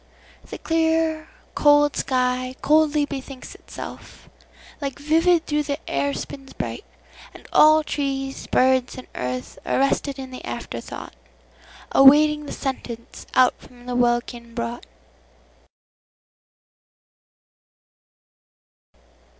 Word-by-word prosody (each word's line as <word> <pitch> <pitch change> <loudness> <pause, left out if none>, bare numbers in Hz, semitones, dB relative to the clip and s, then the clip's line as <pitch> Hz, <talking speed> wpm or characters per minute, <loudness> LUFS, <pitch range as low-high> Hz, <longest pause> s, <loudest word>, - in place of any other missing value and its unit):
The - - -9
clear, 320 -1 0 0.2
cold 290 0 +4
sky 255 0 0
coldly 300 -1 +3
bethinks 275 -2 -8
itself. - - -10 0.5
Like 275 -2 -4
vivid 325 +3 +2
thought 295 -1 -1
the 285 -1 -1
air 140 0 0
spins 270 - -8
bright, - - -5 0.5
and - - -14
allTrees, 280 -3 +2
birds, 260 -1 +2
and 255 - -8
earth, 125 0 -5
arrested 275 +1 0
in 265 -1 -8
the 255 - -9
after - - -5
thoughtAwaiting 300 +2 +1
the - - -6
sentence 240 -4 -6
out 255 -1 +5
from 245 -1 -17
the 250 0 -4
welkin 240 -1 0
brought. 235 0 -4
270 Hz, 95 wpm, -23 LUFS, 250-300 Hz, 0.5 s, out